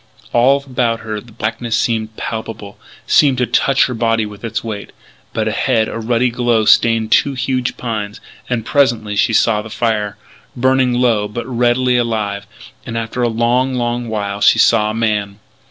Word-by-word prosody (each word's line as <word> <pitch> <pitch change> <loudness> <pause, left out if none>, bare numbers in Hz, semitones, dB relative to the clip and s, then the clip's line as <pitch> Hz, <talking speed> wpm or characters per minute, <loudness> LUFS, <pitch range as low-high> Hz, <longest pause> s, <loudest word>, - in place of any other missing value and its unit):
All 135 +4 +3
about 120 -3 -1
her 110 -1 -5
the 120 - -17
blackness 115 +1 -2
seemed 110 -2 -1
palpable 110 -2 -6 0.3
seemed 140 -3 +4
to 125 - +1
touch 135 +3 +2
her 125 - -3
body 115 -1 +1
with 105 0 -11
its 115 +1 -3
weight; 105 -3 -6 0.4
but, 110 -1 -1
ahead, 110 0 +1
a - - -5
ruddy 120 +2 +1
glow 120 -2 +1
stained 115 0 +3
two 140 - +3
huge 130 -1 -2
pines. 110 -3 -4 0.3
And 120 -3 -2
presently 115 -7 +1
she 110 - +2
saw 110 -1 +3
the 110 - -10
fire, 105 -3 -1 0.4
burning 130 0 +2
low, 115 -4 +2
but 115 +3 -6
redly 125 0 +1
alive. 105 -4 -2 0.4
And, 115 - -5
after 115 +2 -3
a 120 - +2
long, 120 +3 +1
long 120 -1 -2
while, 100 -2 -3
she - - +5
saw 105 +1 +4
a 110 - -3
man. 105 -3 -1
115 Hz, 170 wpm, -17 LUFS, 110-125 Hz, 0.4 s, she